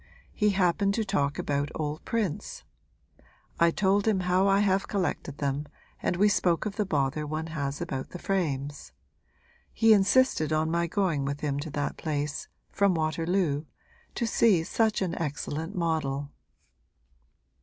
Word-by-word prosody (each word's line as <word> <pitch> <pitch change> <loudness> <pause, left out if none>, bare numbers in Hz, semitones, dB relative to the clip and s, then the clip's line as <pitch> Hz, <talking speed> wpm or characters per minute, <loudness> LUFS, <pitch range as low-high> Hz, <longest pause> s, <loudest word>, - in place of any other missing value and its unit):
He 210 -1 +2
happened 195 +1 +2
to 225 - 0
talk 145 -8 0
about 145 0 -1
old 155 0 -3
prints; 215 -9 -2 1.0
I 170 - +6
told 195 +4 +1
him 200 -4 +2
how 180 +2 +2
I 195 +1 +4
have 195 -1 +2
collected 180 -7 -2
them 140 +1 -2 0.3
and - - 0
we 200 +4 +4
spoke 180 -4 +2
of 210 -1 -3
the 210 -3 -1
bother 150 -2 0
one 155 +2 -3
has 140 0 -3
about 135 -6 -4
the - - -7
frames. 145 -7 -2 0.8
He 225 -1 +5
insisted 195 - +3
on 155 +1 +1
my 170 0 +1
going 170 -6 0
with 140 +1 -3
him 145 -2 -1
to 150 - -5
that 145 0 -3
place 150 -2 -3 0.2
from 200 -2 +2
Waterloo 160 -1 0 0.5
to 235 - 0
see 220 -6 +3
such 220 +3 +1
an 180 - -2
excellent 155 +3 -3
model.' 145 -5 -1
165 Hz, 150 wpm, -28 LUFS, 145-195 Hz, 1.0 s, I